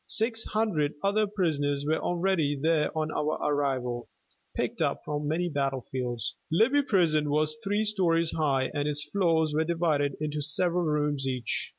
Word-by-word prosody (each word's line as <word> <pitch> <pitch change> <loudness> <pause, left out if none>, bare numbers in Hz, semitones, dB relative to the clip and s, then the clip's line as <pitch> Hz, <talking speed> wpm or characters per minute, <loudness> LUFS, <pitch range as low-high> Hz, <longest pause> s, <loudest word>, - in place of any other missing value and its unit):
Six 225 0 +2
hundred 205 -10 0
other 210 +2 +2
prisoners 145 -8 -1
were 155 +2 +1
already 175 -4 0
there 155 0 +2
on 155 0 -1
our 150 +1 -1
arrival, 130 -5 -1 0.5
picked - - -2
up - - 0
from 150 0 -3
many 170 +4 0
battlefields. 130 -5 -3
Libby 235 - +4
Prison 170 - +2
was 155 +1 +1
three 205 +2 0
stories 170 -6 +2
high 135 -4 0
and 145 0 -1
its 150 0 +1
floors 165 -5 +1
were 155 +1 +2
divided 160 -4 0
into 150 0 -3
several 175 +4 +1
rooms 150 -3 0
each. 125 -4 -1
155 Hz, 155 wpm, -28 LUFS, 145-175 Hz, 0.5 s, Libby